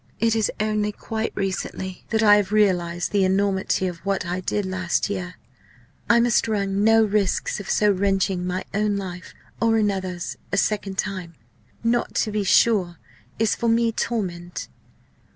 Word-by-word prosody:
It 230 0 +2
is 220 -2 +1
only 215 0 0
quite 220 +1 -4
recently 190 -1 -4
that 225 0 +1
I 205 -1 +7
have 205 -1 -1
realised 175 -5 +1
the 200 -2 +2
enormity 190 0 +1
of 175 -2 -4
what 195 0 -2
I 175 +2 -2
did 200 +2 -2
last 185 0 -1
year. 180 -2 -4 0.7
I 235 - +6
must 235 -1 +3
run 200 -2 0
no 225 +1 +5
risks 210 -2 0
of 200 - -8
so 210 -1 +3
wrenching 195 -1 0
my 180 +1 -2
own 210 0 +1
life 185 -2 -7 0.3
or 225 -1 +3
another's 190 -4 -2
a 200 - 0
second 200 -1 0
time. 185 -5 -3 0.5
Not 235 +1 0
to 215 - +1
be 210 -1 -1
sure 190 -3 +3 0.4
is 225 -2 +2
for 235 - -1
me 230 0 +3
torment. 180 -7 -3
200 Hz, 160 wpm, -23 LUFS, 185-215 Hz, 0.7 s, I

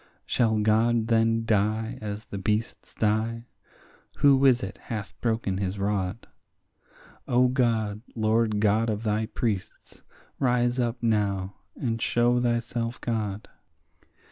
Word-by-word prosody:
Shall 110 -3 +1
God 110 +2 +2
then 115 0 +2
die 110 +1 0
as 105 0 -5
the 100 - -6
beasts 105 +4 -2
die? 110 +2 0 0.7
who 140 -1 +4
is 125 -4 +4
it 100 +2 -6
hath 105 -3 -6
broken 110 -5 -1
his 95 0 -2
rod? 100 +1 -2 1.0
O 125 +1 +4
God, 115 -5 0
Lord 110 -1 +1
God 110 +2 +2
of 105 0 -2
thy 110 0 0
priests, 105 -5 -4 0.4
rise 125 -1 +1
up 120 0 -1
now 100 -4 0 0.2
and 115 -3 -2
show 120 +1 +2
thyself 120 0 -1
God. 110 -3 -3
110 Hz, 120 wpm, -26 LUFS, 105-120 Hz, 1.0 s, who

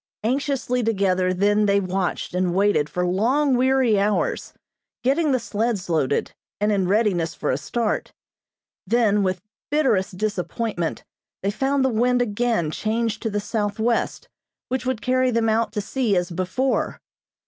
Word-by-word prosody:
Anxiously 260 0 0
together 190 -5 +1
then 205 +3 +2
they 200 0 +4
watched 185 -2 -2
and 180 -1 0
waited 195 -7 +2
for 180 +3 -1
long, 250 +10 +2
weary 255 -4 +3
hours, 205 +1 0 0.5
getting 285 +4 +2
the 260 - +3
sleds 220 -4 -2
loaded, 145 -4 0 0.3
and 210 +1 +2
in 195 -3 +1
readiness 190 -5 +1
for 150 - -1
a 130 - 0
start; 220 +9 -2 0.8
then, 215 -2 +3
with 185 -1 -1 0.3
bitterest 210 -11 +1
disappointment, 205 -2 -2 0.4
they 200 - +1
found 270 +5 +1
the - - +3
wind 245 +2 +2
again 225 -7 0
changed 220 +3 -1
to 225 - -1
the 205 0 -1
southwest, 220 +2 -1 0.4
which 255 0 -2
would 255 -3 -2
carry 255 0 +2
them 230 -2 +1
out 225 +1 +1
to 210 - -1
sea 215 -1 0
as 175 0 -1
before. 185 +10 -1
215 Hz, 150 wpm, -23 LUFS, 190-245 Hz, 0.8 s, they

